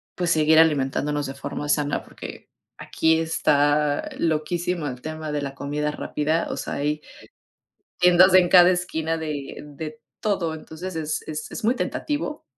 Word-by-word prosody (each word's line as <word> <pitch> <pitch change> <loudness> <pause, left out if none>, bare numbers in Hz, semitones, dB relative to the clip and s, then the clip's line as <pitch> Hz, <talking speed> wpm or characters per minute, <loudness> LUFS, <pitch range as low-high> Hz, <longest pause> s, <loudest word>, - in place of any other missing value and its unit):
pues, 175 -1 -1
seguir 155 0 +5
alimentándonos 145 -1 +2
de 135 - -5
forma 145 +1 -5
sana, 145 -1 0
porque - - -10 0.3
aquí 160 0 +1
está 150 -2 +2
loquísimo 165 +1 -1
el 125 -2 -6
tema 155 -1 -5
de 145 -1 -1
la 140 -1 -5
comida 150 +1 -2
rápida. 155 +2 -1
O - - -4
sea, - - -4
hay 150 +1 -1 1.0
tiendas 180 +1 +6
en 180 -2 +6
cada 180 -1 +8
esquina 165 -3 -1
de 150 -4 -5
de 155 +1 -8 0.2
todo. 190 -6 0
Entonces, 160 +3 -8
es 155 -1 -2
es 155 0 -5
es - - -7
muy 235 +4 +3
tentativo 295 +2 -3
155 Hz, 155 wpm, -24 LUFS, 150-175 Hz, 1.0 s, cada